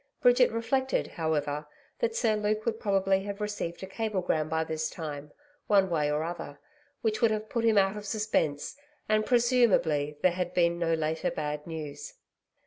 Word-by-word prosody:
Bridget 245 0 +5
reflected, 260 +4 0
however, 150 -2 -2 0.3
that 470 -1 0
Sir 225 - +2
Luke 210 +1 -1
would 225 -1 -1
probably 195 -1 +2
have 200 0 -5
received 205 -5 -4
a - - -2
cablegram 190 -6 -1
by 160 0 +1
this 160 0 -2
time, 150 -2 -6 0.4
one 195 -3 +4
way 150 -3 +1
or 150 +1 0
other 165 -3 -6 0.5
which 220 -1 0
would 230 - +5
have 215 0 -2
put 235 - -1
him 220 -2 +4
out 195 0 +3
of 210 0 -7
suspense, 205 - -1 0.3
and, 215 0 +2
presumably, 225 - +3
there 185 - +5
had 180 0 -3
been 170 -1 +2
no 165 -1 +2
later 160 0 -1
bad 150 0 -4
news. 155 -3 -7
190 Hz, 170 wpm, -29 LUFS, 160-215 Hz, 0.5 s, Bridget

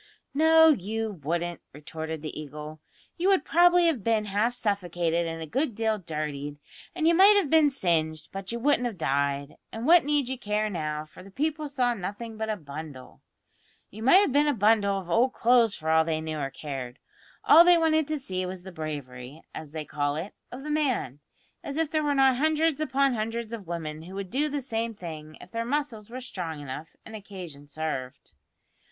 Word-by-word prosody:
"No, 320 +2 +6
you 220 - 0
wouldn't," 170 +3 -2
retorted 160 +1 -6
the 155 - -5
Eagle. 150 +1 -8 0.4
"You 360 +3 +2
would 385 -2 +3
probably 350 +1 +5
have 300 - +1
been 220 -1 +1
half 210 +4 0
suffocated 175 -6 -1
and 165 0 -5
a - - -5
good 250 - -1
deal 220 -1 0
dirtied, 150 -4 -5 0.4
and 325 -2 +1
you 335 - +5
might 395 +4 +7
have 350 -9 +1
been 315 -2 +6
singed, 160 - -1
but 195 +1 -6
you 235 - -3
wouldn't 250 0 +2
have 225 -5 -6
died; 140 -2 -1
and 225 +2 -5
what 340 +3 +7
need 290 -2 +1
you 260 -1 -4
care 210 -1 -1
now, 155 -3 -3
for 155 - -15
the 195 - -13
people 300 +6 -2
saw 250 -3 +1
nothing 220 +3 -6
but 220 0 -3
a 215 - 0
bundle. 145 -4 -9 0.7
You 215 - -10
might 265 +9 +5
have 400 -7 +4
been 290 +3 +3
a 290 - +2
bundle 205 -2 +3
of 190 -3 -6
old 235 +9 +2
clothes 235 -3 +4
for 160 0 -2
all 160 0 +5
they 160 -1 -1
knew 155 -1 -4
or 135 -1 -2
cared. 135 -4 -6 0.5
All 335 - +8
they 350 0 +6
wanted 315 -2 +2
to 310 -1 -1
see 185 -9 -3
was 180 0 -6
the 190 - -9
bravery, 145 -3 -7
as 155 -2 -7
they 155 0 -6
call 145 -1 -1
it, 170 +7 -5 0.2
of 255 +2 -8
the 300 - -4
man; 265 - 0 0.4
as 280 +1 -5
if 320 -2 0
there 310 - +1
were 290 -1 +1
not 265 -2 +4
hundreds 310 +1 +1
upon 275 -2 +2
hundreds 225 0 -3
of 210 -6 -7
women 160 -2 -5
who 180 +4 -10
would 195 -2 -5
do 290 +5 +1
the 290 -1 -2
same 230 -3 -3
thing 155 -4 -8
if 180 - -14
their 230 0 -2
muscles 240 -5 -3
were 255 +2 -7
strong 175 - -5
enough, 145 +2 -8
and 220 - -9
occasion 180 -9 -9
served." 140 - -5
205 Hz, 205 wpm, -27 LUFS, -, 0.7 s, All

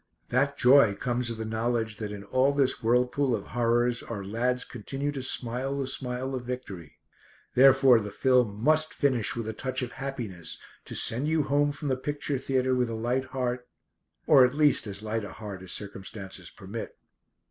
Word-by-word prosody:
That 140 +3 +1
joy 125 -5 +6
comes 120 +2 -1
of 115 - -4
the 110 - -4
knowledge 110 0 -1
that 105 -1 -5
in 100 -1 -7
all 130 +6 +2
this 140 -2 +1
whirlpool 125 +3 +2
of - - -5
horrors 120 0 +2
our 105 -4 -6
lads 125 +5 -1
continue 135 +5 -4
to 140 -2 -5
smile 130 +2 -1
the 140 -1 -2
smile 130 0 -3
of 130 - -2
victory. 105 - -7 0.6
Therefore 130 -1 +6
the 105 -1 -5
film 115 -1 +1
must 155 +2 +3
finish 130 -7 +1
with 115 -2 -4
a 110 - -3
touch 130 +3 -2
of 125 - -5
happiness 120 -11 -6 0.3
to - - -7
send 125 +6 +1
you 160 -1 +2
home 145 +1 +2
from 145 0 -5
the 130 - +1
picture 145 0 -2
theatre 130 -1 0
with 125 -2 +1
a 115 - -3
light 120 +4 -1
heart 125 -1 -3 0.6
or 140 -4 +7
at 125 +2 +2
least 150 -6 +3
as 100 +1 -7
light 110 0 -2
a - - -7
heart 105 -4 -8
as 95 -1 -7
circumstances 95 -2 -7
permit. 105 +3 -8
125 Hz, 185 wpm, -28 LUFS, 110-135 Hz, 0.6 s, or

